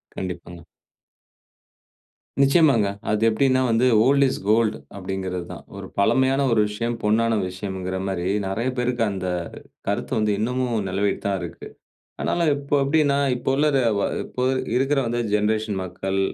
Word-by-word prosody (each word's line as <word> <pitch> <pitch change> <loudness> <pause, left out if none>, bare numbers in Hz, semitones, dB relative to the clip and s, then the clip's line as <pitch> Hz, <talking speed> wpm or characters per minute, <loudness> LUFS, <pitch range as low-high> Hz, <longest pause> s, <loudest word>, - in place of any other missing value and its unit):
கண்டிப்பாங்க. 90 -2 -6 1.8
நிச்சயமாங்க. 140 -6 +4 0.2
அது 105 +1 +1
எப்டீன்னா, 130 +3 +2
வந்து 115 +3 +3 0.2
ஓல்ட் 140 +2 +4
இஸ் - - -2
கோல்ட், 110 0 +3 0.2
அப்டீங்குறது 95 -2 -4
தான். - - -9
ஒரு - - -7
பழமையான 130 +5 +3
ஒரு 110 -2 +4
விஷயம், 115 +3 -3
பொன்னான 115 +2 +2 0.2
விஷயங்குற 95 -1 -4
மாரி, 90 -2 -2 0.2
நெறையா 115 +7 -1
பேருக்கு 125 -1 0
அந்த 95 -1 -4 0.6
கருத்து - - -2
வந்து 105 -1 +1
இன்னமும் 120 -2 -1
நிலவிட்டு 100 +2 -1
தான் 100 -1 +1
இருக்கு. 85 - -8 0.5
ஆனாலும் 170 -3 +1
இப்போ 140 0 -2
எப்டீன்னா, 145 0 +2 0.2
இப்போ 125 - -3
உள்ள 150 +2 +3
ர - - +4 0.2
ஒ - - 0
அ - - 0 0.2
இப்போ 125 - -4 0.3
இருக்குற 135 +2 +2
வந்து 120 +1 -1
ஜென்ரேஷன் 105 -1 0
மக்கள் 95 +2 -3
110 Hz, 145 wpm, -23 LUFS, 95-130 Hz, 1.8 s, நிச்சயமாங்க